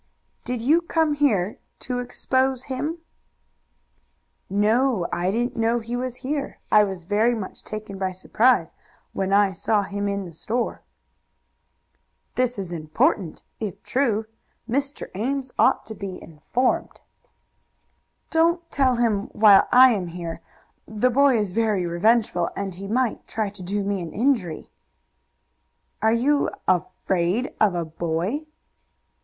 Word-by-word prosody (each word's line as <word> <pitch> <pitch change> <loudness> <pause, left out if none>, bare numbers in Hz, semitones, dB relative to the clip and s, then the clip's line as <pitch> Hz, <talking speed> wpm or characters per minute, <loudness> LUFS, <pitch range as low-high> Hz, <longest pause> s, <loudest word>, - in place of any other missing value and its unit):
"Did 245 -2 -3
you 310 +7 +4
come 320 -2 +1
here 220 -10 +1 0.2
to 250 -1 -3
expose 260 +1 0
him?" 290 +5 -3 1.5
"No; 215 +1 +2
I 180 +1 0
didn't 240 +5 -1
know 230 +1 +1
he 235 +1 -4
was 250 0 -3
here. 285 0 -3
I 210 0 +7
was 190 -4 -4
very 215 +6 +2
much 205 -4 -7
taken 215 -2 -7
by 190 -1 -1
surprise 200 0 +2 0.4
when 190 0 -2
I 200 0 +4
saw 205 +3 +1
him 200 +1 -3
in 200 -1 -2
the 170 - -10
store." 230 +9 -3 1.5
"This 250 -2 0
is 190 -3 -5
important, 160 +2 0 0.2
if 205 -2 -5
true. 230 -5 0 0.4
Mr. 275 +4 -2
Ames 260 +6 -2
ought - - +4
to 220 - -7
be 195 -3 -6
informed." 195 +11 -2 1.3
"Don't 335 +1 +2
tell 265 -3 +3
him 225 -4 +1
while 210 -2 +6
I 255 +1 +8
am 195 -6 -1
here. 170 -1 -6 0.5
The 220 +4 +1
boy 275 0 +4
is 205 -4 -1
very 215 -4 +1
revengeful, 180 0 +2
and 195 -1 -3
he 195 +3 -8
might 240 +2 -1
try 215 -2 -2
to 200 -1 -13
do 200 +3 -2
me 200 -1 -1
an 170 - -7
injury." 220 - 0 1.3
"Are 220 - +4
you 275 +5 +2 0.2
afraid 185 +4 0
of 205 -4 +4
a 170 -1 -1
boy?" 170 - -3
215 Hz, 135 wpm, -24 LUFS, 190-250 Hz, 1.5 s, I